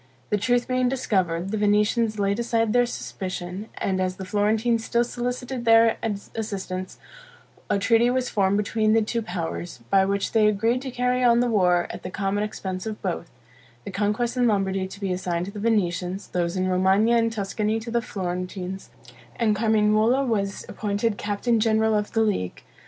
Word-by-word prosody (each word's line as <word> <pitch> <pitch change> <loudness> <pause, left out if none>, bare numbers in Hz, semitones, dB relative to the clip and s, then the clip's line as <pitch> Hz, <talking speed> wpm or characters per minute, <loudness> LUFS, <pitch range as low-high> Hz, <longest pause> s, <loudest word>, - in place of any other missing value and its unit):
The 210 - +3
truth 245 +3 +1
being 255 -1 +1
discovered, 190 -8 -1
the 215 - -1
Venetians 210 +2 +2
laid 200 +1 0
aside 230 -2 +1
their 245 0 +4
suspicion; 180 - -5
and 190 -1 -1
as 185 0 -1
the 190 - -7
Florentines 220 +4 +1
still 235 +1 +1
solicited 245 +1 -4
their 225 -1 +5 0.4
assistance, 190 -4 -4 0.7
a - - +2
treaty 230 +4 +3
was 255 0 0
formed 200 -2 +1
between 215 +1 +1
the 225 0 +4
two 230 +2 -2
powers, 175 - -5
by 195 -1 +5
which 200 0 -1
they 220 -2 +4
agreed 225 +4 +1
to 270 - -5
carry 250 0 0
on 235 -1 +5
the 245 - +3
war 180 -4 +3
at - - -8
the 180 - -6
common 195 +2 -1
expense 190 -2 -4
of 215 -1 -5
both: 170 -3 -3 0.6
the - - -5
conquests 210 +5 0
in 250 -1 +3
Lombardy 195 -3 0
to 195 +1 -11
be 195 -3 -1
assigned 180 -1 -2
to 200 - -7
the 205 - -7
Venetians; 190 -3 -1
those 175 0 -1
in 185 0 0
Romagna 190 +5 +3
and 230 -1 +2
Tuscany 215 +1 -1
to 230 +1 -7
the 235 0 +1
Florentines; 185 -2 -5 0.5
and 220 -3 +1
Carmignuola 220 +4 +3
was 200 -5 -1
appointed 210 +1 -2
Captain 210 +3 0
General 220 0 +2
of 210 -1 -1
the 225 - +2
League. 200 - -1
210 Hz, 180 wpm, -24 LUFS, 190-230 Hz, 0.7 s, their